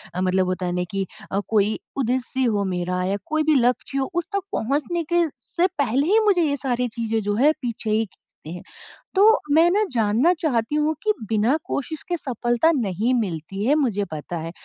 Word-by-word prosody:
अ, 180 Hz, -, -1 dB
मतलब 185 Hz, 0 st, +2 dB
होता 185 Hz, 0 st, -2 dB
है 175 Hz, -, -1 dB
ना 180 Hz, -, 0 dB
कि 195 Hz, -1 st, -1 dB, 0.3 s
अ, 195 Hz, -, +1 dB
कोई 215 Hz, 0 st, +1 dB, 0.2 s
उद्देश्य 260 Hz, +1 st, -1 dB
हो 205 Hz, -3 st, +1 dB
मेरा 180 Hz, +1 st, -1 dB
या 195 Hz, +2 st, 0 dB
कोई 310 Hz, 0 st, 0 dB
भी 310 Hz, -1 st, +3 dB
लक्ष्य 265 Hz, +2 st, +1 dB
उस 345 Hz, -1 st, -1 dB
तक 400 Hz, -, +1 dB
पहुँचने 300 Hz, +8 st, -1 dB
के 345 Hz, -1 st, +4 dB
स -, -, -23 dB, 0.3 s
से 360 Hz, +2 st, +5 dB
पहले 275 Hz, +2 st, +1 dB
ही 430 Hz, +4 st, +5 dB
मुझे 385 Hz, -4 st, +4 dB
ये 285 Hz, -2 st, 0 dB
सारी 250 Hz, -2 st, -1 dB
चीज़ें 225 Hz, -1 st, -2 dB
जो 205 Hz, 0 st, -1 dB
है 285 Hz, +7 st, +5 dB
पीछे 235 Hz, -3 st, -4 dB
ही 220 Hz, +1 st, +2 dB
खींचते 160 Hz, -4 st, -17 dB
हैं। 175 Hz, +1 st, -7 dB, 0.5 s
तो 440 Hz, +4 st, +6 dB, 0.2 s
मैं 330 Hz, +2 st, +6 dB
ना 420 Hz, +3 st, +3 dB
जानना 230 Hz, +8 st, +3 dB
चाहती 255 Hz, -3 st, 0 dB
हूँ 300 Hz, +1 st, +1 dB
कि 425 Hz, 0 st, +3 dB, 0.2 s
बिना 225 Hz, +7 st, +2 dB
कोशिश 305 Hz, +3 st, -4 dB
के 350 Hz, -, 0 dB
सफलता 240 Hz, +3 st, +1 dB
नहीं 225 Hz, -, 0 dB
मिलती 190 Hz, +1 st, -4 dB
है 285 Hz, -, +4 dB
मुझे 225 Hz, -9 st, 0 dB
पता 155 Hz, +3 st, -5 dB
है, 165 Hz, +1 st, -5 dB
240 Hz, 205 wpm, -23 LUFS, 200-300 Hz, 0.5 s, तो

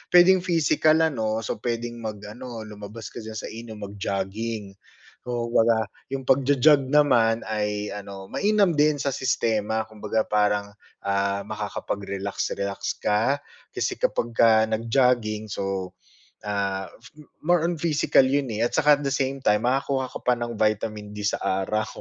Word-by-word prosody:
pwedeng 185 Hz, +2 st, +8 dB
physical 160 Hz, -3 st, +3 dB
ano, 110 Hz, -7 st, 0 dB
so 110 Hz, -, -4 dB
pwedeng 120 Hz, 0 st, -3 dB
mag-ano 110 Hz, +2 st, -7 dB
lumabas 105 Hz, +1 st, -9 dB
ka -, -, -8 dB
diyan 110 Hz, -1 st, -8 dB
sa -, -, -5 dB
inyo, 115 Hz, 0 st, -8 dB
mag-jogging. 100 Hz, +1 st, -4 dB, 0.6 s
Oo 120 Hz, -1 st, -2 dB
kumbaga, 115 Hz, -1 st, +4 dB, 0.2 s
'yung 135 Hz, 0 st, -4 dB
pagjo-jog 135 Hz, +1 st, +4 dB
naman 120 Hz, -6 st, +3 dB
ay 105 Hz, -1 st, -2 dB
ano, 100 Hz, -1 st, -8 dB
mainam 205 Hz, -3 st, +3 dB
din 150 Hz, -1 st, +3 dB
sa 140 Hz, -1 st, -1 dB
sistema. 110 Hz, -4 st, 0 dB
Kumbaga 110 Hz, 0 st, -2 dB
parang, 105 Hz, -1 st, +1 dB, 0.3 s
ah, 100 Hz, 0 st, 0 dB
makakapag-relax-relax 100 Hz, -1 st, -3 dB
ka, 120 Hz, +7 st, +1 dB, 0.3 s
kasi -, -, -2 dB
kapagka 115 Hz, -, +3 dB
nag-jogging, 115 Hz, -2 st, +1 dB
so, 95 Hz, -2 st, -3 dB, 0.5 s
ah, 100 Hz, -2 st, -2 dB, 0.5 s
more 175 Hz, 0 st, +2 dB
on 170 Hz, -1 st, -1 dB
physical 150 Hz, -4 st, +3 dB
'yun 135 Hz, -2 st, 0 dB
eh, 110 Hz, +2 st, +1 dB
at -, -, -6 dB
saka 150 Hz, -2 st, +5 dB
at -, -, -6 dB
the 135 Hz, -, 0 dB
same 135 Hz, 0 st, -1 dB
time, 105 Hz, -5 st, +2 dB
makakuha 130 Hz, +1 st, 0 dB
ka -, -, -6 dB
pa 125 Hz, -1 st, +2 dB
ng 120 Hz, -2 st, -5 dB
vitamin 105 Hz, -1 st, -1 dB
D 105 Hz, -, -5 dB
sa 105 Hz, -, 0 dB
araw, 110 Hz, +4 st, -1 dB
110 Hz, 140 wpm, -25 LUFS, 105-135 Hz, 0.6 s, pwedeng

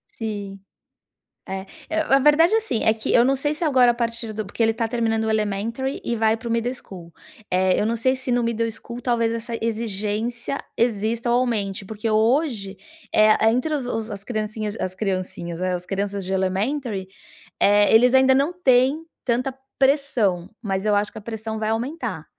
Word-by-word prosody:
Sim. 205 Hz, -3 st, -5 dB, 0.9 s
É 190 Hz, 0 st, -5 dB, 0.2 s
é 320 Hz, 0 st, 0 dB
a 275 Hz, -4 st, +3 dB
verdade 300 Hz, +7 st, +5 dB
é -, -, +5 dB
assim, 435 Hz, -, -1 dB
é 220 Hz, -, +4 dB
que 220 Hz, -, -2 dB
eu 240 Hz, -, +6 dB
não 270 Hz, +1 st, +3 dB
sei 290 Hz, +3 st, -1 dB
se 335 Hz, +2 st, -3 dB
agora 255 Hz, -5 st, +5 dB
a -, -, -3 dB
partir 230 Hz, -1 st, -3 dB
do 215 Hz, 0 st, -4 dB
porque 205 Hz, +4 st, -2 dB
ele 225 Hz, -, +4 dB
está 225 Hz, 0 st, -2 dB
terminando 225 Hz, -2 st, 0 dB
o 220 Hz, -, 0 dB
elementary 220 Hz, +5 st, -1 dB
e 235 Hz, -, -1 dB
vai 220 Hz, 0 st, +2 dB
para 235 Hz, -, -8 dB
o -, -, -2 dB
middle 235 Hz, +2 st, 0 dB
school, 175 Hz, -8 st, -11 dB, 0.4 s
eh, 185 Hz, 0 st, +3 dB
eu 210 Hz, -, +1 dB
não 230 Hz, +1 st, 0 dB
sei 260 Hz, +3 st, +2 dB
se 260 Hz, -1 st, -4 dB
no 245 Hz, 0 st, +2 dB
middle 230 Hz, 0 st, 0 dB
school 235 Hz, +2 st, -8 dB
talvez 230 Hz, -2 st, +1 dB
essa 230 Hz, 0 st, -5 dB
exigência 225 Hz, +3 st, -2 dB, 0.2 s
exista 230 Hz, +1 st, 0 dB
ou 240 Hz, -, +4 dB
aumente, 205 Hz, -6 st, -1 dB
porque 215 Hz, +3 st, -4 dB
hoje 220 Hz, -2 st, +1 dB, 0.4 s
é 215 Hz, 0 st, +5 dB
é 220 Hz, -, +6 dB
entre 255 Hz, +6 st, 0 dB
os 270 Hz, -4 st, -3 dB
os 225 Hz, -2 st, -3 dB
as 200 Hz, -2 st, -6 dB
criancinhas 215 Hz, -1 st, -3 dB
as 185 Hz, 0 st, -3 dB
criancinhas, 185 Hz, -3 st, -3 dB
as 180 Hz, -1 st, -1 dB
crianças 200 Hz, 0 st, -3 dB
de 190 Hz, -, -5 dB
elementary, 195 Hz, +2 st, -1 dB, 0.5 s
eh, 205 Hz, +1 st, +5 dB
eles 245 Hz, +3 st, +6 dB
ainda 265 Hz, 0 st, +6 dB
não 280 Hz, +6 st, +2 dB
têm 270 Hz, -1 st, +3 dB, 0.2 s
tanta 255 Hz, +2 st, 0 dB, 0.3 s
pressão. 240 Hz, -, +2 dB
Mas 195 Hz, -2 st, -2 dB
eu 210 Hz, -, +3 dB
acho 205 Hz, 0 st, +1 dB
que -, -, -12 dB
a -, -, -7 dB
pressão 220 Hz, 0 st, -5 dB
vai 215 Hz, 0 st, -1 dB
aumentar, 250 Hz, +9 st, -3 dB
225 Hz, 195 wpm, -23 LUFS, 205-250 Hz, 0.9 s, eu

